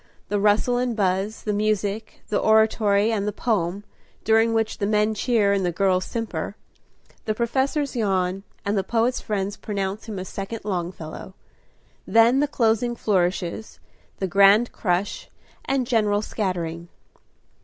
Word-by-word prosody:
The 205 Hz, -, 0 dB
rustle 210 Hz, +4 st, +3 dB
and 245 Hz, -1 st, -1 dB
buzz, 195 Hz, +1 st, -1 dB
the 210 Hz, -, -1 dB
music, 210 Hz, 0 st, -2 dB
the 210 Hz, -, +1 dB
oratory 220 Hz, -1 st, +3 dB
and 205 Hz, -2 st, -1 dB
the -, -, 0 dB
poem, 200 Hz, -3 st, -1 dB, 0.4 s
during 225 Hz, +1 st, +3 dB
which 225 Hz, -1 st, -1 dB
the 200 Hz, -, 0 dB
men 210 Hz, +1 st, +2 dB
cheer 215 Hz, -2 st, +2 dB
and 195 Hz, -1 st, 0 dB
the 175 Hz, -, +1 dB
girls 185 Hz, +1 st, +1 dB
simper; 230 Hz, -1 st, -4 dB, 0.7 s
the 215 Hz, -, -1 dB
professors 265 Hz, +5 st, 0 dB
yawn, 190 Hz, -4 st, 0 dB, 0.2 s
and 200 Hz, +1 st, 0 dB
the 195 Hz, -, +1 dB
poet's 235 Hz, +5 st, 0 dB
friends 205 Hz, -1 st, -3 dB
pronounce 200 Hz, 0 st, -4 dB
him 215 Hz, -3 st, -5 dB
a 185 Hz, -, -4 dB
second 195 Hz, +4 st, -6 dB
Longfellow. 180 Hz, -2 st, -5 dB, 0.7 s
Then 230 Hz, +3 st, +5 dB
the 295 Hz, -, +2 dB
closing 240 Hz, -2 st, +1 dB
flourishes, 185 Hz, -1 st, -1 dB, 0.4 s
the 195 Hz, -, -2 dB
grand 200 Hz, +5 st, +5 dB
crush, 185 Hz, 0 st, -2 dB, 0.4 s
and 270 Hz, -2 st, 0 dB
general 210 Hz, -3 st, +1 dB
scattering. 170 Hz, -6 st, -3 dB
210 Hz, 145 wpm, -23 LUFS, 195-225 Hz, 0.7 s, Then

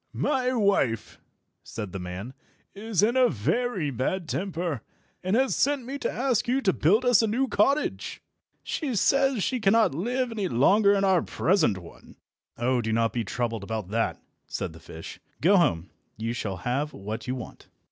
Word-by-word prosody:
"My 255 Hz, -3 st, 0 dB
wife," 200 Hz, -, +1 dB, 0.4 s
said 105 Hz, -4 st, -7 dB
the 95 Hz, -, -5 dB
man, 90 Hz, +7 st, -6 dB, 0.4 s
"is 205 Hz, -1 st, -1 dB
in 235 Hz, +4 st, +3 dB
a 255 Hz, -1 st, +5 dB
very 160 Hz, -, -1 dB
bad 160 Hz, +8 st, -2 dB
temper, 170 Hz, -, -2 dB, 0.4 s
and 185 Hz, +3 st, +1 dB
has 265 Hz, +2 st, +2 dB
sent 280 Hz, -2 st, +1 dB
me 275 Hz, +3 st, -5 dB
to -, -, -1 dB
ask 250 Hz, -3 st, 0 dB
you 255 Hz, +2 st, +2 dB
to 190 Hz, -7 st, +2 dB
build 210 Hz, +11 st, +3 dB
us 245 Hz, -4 st, +5 dB
a 225 Hz, -, +1 dB
new 250 Hz, +5 st, +1 dB
cottage. 275 Hz, +7 st, 0 dB, 0.4 s
She 275 Hz, -7 st, -3 dB
says 270 Hz, +1 st, +2 dB
she 255 Hz, -, 0 dB
cannot 220 Hz, -, +3 dB
live 245 Hz, -, -1 dB
any 210 Hz, -4 st, -2 dB
longer 200 Hz, -, +4 dB
in 195 Hz, -, +1 dB
our 190 Hz, -3 st, +4 dB
present 175 Hz, -, +1 dB
one." 85 Hz, -3 st, -13 dB, 0.4 s
"Oh, 125 Hz, +1 st, +1 dB
do 110 Hz, 0 st, -2 dB
not 115 Hz, -1 st, +1 dB
be 120 Hz, -, -1 dB
troubled 115 Hz, 0 st, -3 dB
about 110 Hz, -2 st, -4 dB
that," 115 Hz, +2 st, -1 dB, 0.3 s
said -, -, -4 dB
the 80 Hz, -, -13 dB
fish. 80 Hz, 0 st, -10 dB, 0.2 s
"Go 190 Hz, +7 st, +5 dB
home. 90 Hz, -, +1 dB, 0.3 s
You 115 Hz, +2 st, -2 dB
shall 100 Hz, -5 st, -3 dB
have 140 Hz, +5 st, -1 dB
what 105 Hz, +5 st, -6 dB
you 130 Hz, -, -1 dB
want." 125 Hz, -, -9 dB
180 Hz, 180 wpm, -26 LUFS, -, 0.4 s, a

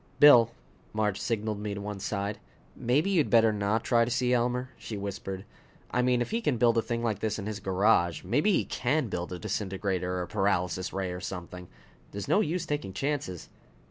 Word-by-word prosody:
"Bill!" 125 Hz, -6 st, +8 dB, 0.4 s
Marge 105 Hz, -2 st, 0 dB
signaled 110 Hz, -2 st, -1 dB
me 105 Hz, -1 st, -3 dB
to -, -, -5 dB
one 105 Hz, -1 st, -5 dB
side. 100 Hz, +1 st, -3 dB, 0.4 s
"Maybe 145 Hz, +11 st, +1 dB
you'd 170 Hz, -6 st, +2 dB
better 115 Hz, -2 st, +5 dB
not 105 Hz, +2 st, 0 dB
try 120 Hz, -2 st, +3 dB
to 115 Hz, -, -1 dB
see 125 Hz, +1 st, +1 dB
Elmer," 125 Hz, +1 st, 0 dB
she 110 Hz, -, -7 dB
whispered. 95 Hz, -1 st, -5 dB, 0.5 s
"I 125 Hz, -, +2 dB
mean, 125 Hz, -1 st, +2 dB
if -, -, -9 dB
he 230 Hz, +1 st, 0 dB
can 145 Hz, -, +1 dB
build 115 Hz, 0 st, +4 dB
a -, -, +2 dB
thing 115 Hz, 0 st, -3 dB
like 110 Hz, -4 st, 0 dB
this 110 Hz, -1 st, -1 dB
in 100 Hz, -, -5 dB
his 105 Hz, 0 st, -4 dB
garage, 95 Hz, -4 st, +2 dB
maybe 145 Hz, -, +2 dB
he -, -, +2 dB
can 135 Hz, 0 st, 0 dB
build 90 Hz, -1 st, -4 dB
a 90 Hz, -, -4 dB
disintegrator 95 Hz, -2 st, -2 dB
or 90 Hz, -, -1 dB
a -, -, -7 dB
paralysis 95 Hz, -3 st, 0 dB
ray 95 Hz, -1 st, -2 dB
or 90 Hz, 0 st, -6 dB
something. 90 Hz, -1 st, -7 dB, 0.5 s
There's 100 Hz, -1 st, -5 dB
no -, -, +4 dB
use 170 Hz, -1 st, -1 dB
taking 145 Hz, -12 st, -3 dB
chances." 135 Hz, -, -3 dB
105 Hz, 205 wpm, -29 LUFS, 95-125 Hz, 0.5 s, Bill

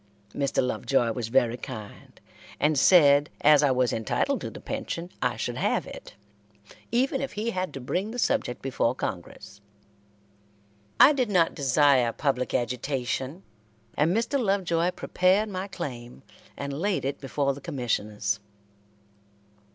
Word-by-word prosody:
Mr. 140 Hz, -2 st, 0 dB
Lovejoy 125 Hz, -1 st, 0 dB
was 115 Hz, 0 st, -4 dB
very 120 Hz, -1 st, +2 dB
kind, 110 Hz, -6 st, -10 dB, 0.4 s
and 150 Hz, +1 st, +2 dB
said 145 Hz, -3 st, +6 dB
as 150 Hz, -1 st, +6 dB
I 145 Hz, -, +3 dB
was 125 Hz, -2 st, +1 dB
entitled 110 Hz, -1 st, -1 dB
to -, -, -4 dB
the -, -, -10 dB
pension, 170 Hz, +2 st, -5 dB
I -, -, 0 dB
should -, -, -3 dB
have -, -, 0 dB
it, -, -, -11 dB, 0.8 s
even 260 Hz, +3 st, +1 dB
if 275 Hz, -, -4 dB
he 220 Hz, +3 st, -2 dB
had 185 Hz, -2 st, -3 dB
to -, -, -5 dB
bring 180 Hz, +11 st, -2 dB
the 240 Hz, -, -6 dB
subject 125 Hz, -, -1 dB
before 130 Hz, -2 st, 0 dB
Congress. 100 Hz, -1 st, -7 dB, 1.4 s
I 285 Hz, -, +8 dB
did 255 Hz, -5 st, 0 dB
not 175 Hz, -5 st, +3 dB
desire 135 Hz, -3 st, +3 dB
public 135 Hz, -2 st, -1 dB
agitation, 130 Hz, -, -2 dB, 0.5 s
and 155 Hz, +3 st, +2 dB
Mr. 255 Hz, +5 st, 0 dB
Lovejoy 180 Hz, -4 st, +1 dB
prepared 185 Hz, +3 st, +1 dB
my 190 Hz, 0 st, -4 dB
claim 125 Hz, -8 st, -7 dB, 0.3 s
and 140 Hz, 0 st, -4 dB
laid 185 Hz, +2 st, -1 dB
it 140 Hz, +1 st, -3 dB
before 140 Hz, 0 st, -1 dB
the 140 Hz, -, -11 dB
Commissioners. 110 Hz, -6 st, -2 dB
140 Hz, 140 wpm, -26 LUFS, 125-185 Hz, 1.4 s, I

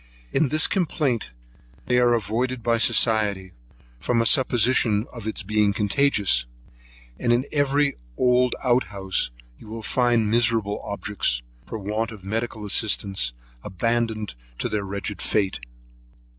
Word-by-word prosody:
In 155 Hz, -, +3 dB
this 155 Hz, +3 st, +4 dB
complaint 150 Hz, -, 0 dB, 0.6 s
they 125 Hz, 0 st, +2 dB
are 120 Hz, -1 st, +4 dB
avoided 120 Hz, +3 st, -2 dB
by 115 Hz, -1 st, +2 dB
society, 105 Hz, -5 st, +2 dB, 0.5 s
from 120 Hz, -, 0 dB
a 115 Hz, -, +2 dB
supposition 120 Hz, -3 st, +3 dB
of 115 Hz, -3 st, -8 dB
its 110 Hz, -, -4 dB
being 105 Hz, 0 st, +1 dB
contagious; 105 Hz, -, +2 dB, 0.7 s
and 120 Hz, -, +1 dB
in 120 Hz, +3 st, +2 dB
every 145 Hz, 0 st, +1 dB, 0.2 s
old 125 Hz, 0 st, +3 dB
out 125 Hz, 0 st, +3 dB
house, 95 Hz, -2 st, 0 dB, 0.3 s
you -, -, -14 dB
will 110 Hz, +1 st, -7 dB
find 120 Hz, -3 st, +1 dB
miserable 115 Hz, -3 st, +1 dB
objects, 100 Hz, -12 st, -1 dB, 0.2 s
for 115 Hz, -, -5 dB
want 105 Hz, +2 st, -2 dB
of 105 Hz, -4 st, -11 dB
medical 110 Hz, +1 st, -3 dB
assistance, 100 Hz, -, +1 dB, 0.3 s
abandoned 110 Hz, -, -1 dB, 0.2 s
to -, -, -2 dB
their 105 Hz, -1 st, -1 dB
wretched 100 Hz, 0 st, -5 dB
fate. 100 Hz, -, 0 dB
110 Hz, 130 wpm, -24 LUFS, 105-125 Hz, 0.7 s, this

